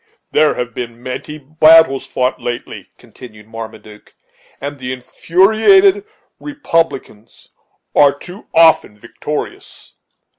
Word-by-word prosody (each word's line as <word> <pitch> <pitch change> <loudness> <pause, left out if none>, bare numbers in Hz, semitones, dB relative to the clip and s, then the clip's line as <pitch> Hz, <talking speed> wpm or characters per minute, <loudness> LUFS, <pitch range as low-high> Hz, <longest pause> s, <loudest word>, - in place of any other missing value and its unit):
"There 155 0 +2
have 125 -1 -5
been 120 0 -8
many 130 +4 -7
battles 155 -1 +4
fought 125 0 -2
lately," 120 0 -7
continued 105 -4 -15
Marmaduke, 110 -1 -11 0.4
"and 140 0 -7
the 125 0 -5
infuriated 220 - +2 0.3
republicans 165 - -4 0.5
are 145 -1 +5
too 180 +8 -12
often 160 -10 +3
victorious. 120 +7 -8
140 Hz, 100 wpm, -16 LUFS, 120-165 Hz, 0.5 s, are